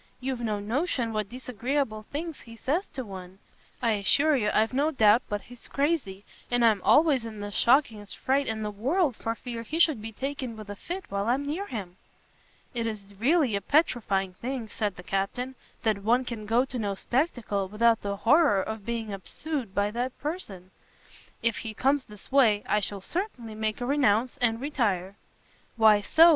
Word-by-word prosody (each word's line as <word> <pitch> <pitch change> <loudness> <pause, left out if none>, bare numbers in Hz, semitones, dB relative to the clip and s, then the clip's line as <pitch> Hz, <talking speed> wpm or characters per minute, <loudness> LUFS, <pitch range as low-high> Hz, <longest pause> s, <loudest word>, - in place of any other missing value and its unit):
You've 260 -1 -3
no 215 -3 -1
notion 235 - -1
what 215 -2 -2
disagreeable 250 -2 -2
things 320 +1 -4
he 230 -1 -12
says 310 - -1
to 260 -2 -4
one. 190 -2 -9 0.5
I 230 - +3
assure 280 +9 +3
you 210 -6 +1
I've 220 +3 +2
no 285 +4 +2
doubt 225 -5 +5
but 205 0 -2
he's 245 -1 -10
crazy; 275 - -1 0.2
and 245 -1 +3
I'm 215 -4 +4
always 295 - +5
in 220 -2 -7
the 205 0 -5
shockingest 225 -4 +2
fright 275 +1 +1
in 220 -1 -2
the 210 - -2
world 270 - +1
for 225 +1 -3
fear 235 -1 -6
he 295 +8 -4
should 310 -9 +4
be 225 +1 -6
taken 260 -1 -4
with 210 -1 -8
a - - -5
fit 360 - -6
while 200 +1 -1
I'm 265 +4 +1
near 340 +8 -3
him." 190 - -6 0.8
"It 230 -2 -1
is 205 -2 -6
really 270 -2 +3
a 200 - -1
petrifying 200 - +1
thing," 245 +3 -4
said 210 -5 -2
the 180 - -10
Captain, 195 +8 -2 0.3
"that 215 -3 +2
one 240 +5 +2
can 220 -4 -6
go 235 +4 +3
to 255 -2 -5
no 200 -2 -1
spectacle 235 - -1
without 225 +3 +3
the 200 0 -3
horreur 280 - +4
of 220 -1 -6
being 225 -3 -2
obsede 240 - -4
by 205 +1 +1
that 245 +3 -3
person! 210 - -5 0.7
if 230 -2 +2
he 220 -1 -5
comes 270 +3 +2
this 210 +3 -12
way, 230 -7 +4
I 210 - +2
shall 200 0 -3
certainly 255 - -4
make 215 0 -2
a 245 - -2
renounce, 255 -3 +2
and 235 -3 +1
retire." 205 -10 -1 0.6
"Why 220 -2 +6
so?" 325 +10 +7
230 Hz, 185 wpm, -28 LUFS, 210-270 Hz, 0.8 s, so